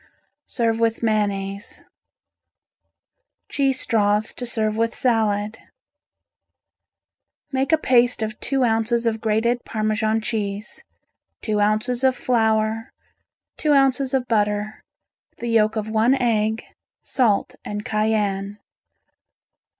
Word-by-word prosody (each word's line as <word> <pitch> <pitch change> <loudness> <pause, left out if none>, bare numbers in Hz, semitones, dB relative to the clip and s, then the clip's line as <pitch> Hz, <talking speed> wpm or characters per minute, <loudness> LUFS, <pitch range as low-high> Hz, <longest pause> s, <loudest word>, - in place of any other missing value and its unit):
Serve 230 -2 0
with 230 0 0
mayonnaise. 200 -2 -1 1.7
Cheese 270 -2 0
Straws 210 -2 +1
to 245 - -5
Serve 215 -2 -1
with 230 +1 0
Salad 215 -3 0 1.9
Make 270 +1 0
a 320 - +5
paste 245 -5 +3
of 215 0 -5
two 270 -2 0
ounces 230 0 +1
of 225 -1 0
grated 230 +2 +1
Parmesan 215 0 0
cheese, 210 -2 -4 0.6
two 215 -2 0
ounces 215 +5 +1
of 260 -1 +4
flour, 220 -2 0 0.7
two 300 -1 +2
ounces 270 -1 +2
of 255 -2 -1
butter, 210 -1 0 0.6
the 235 - -4
yolk 220 -1 +3
of 215 -1 -2
one 220 +4 +3
egg, 220 -3 0 0.4
salt 225 -6 +1
and 210 0 -5
cayenne. 210 -2 -1
220 Hz, 105 wpm, -22 LUFS, 215-240 Hz, 1.9 s, a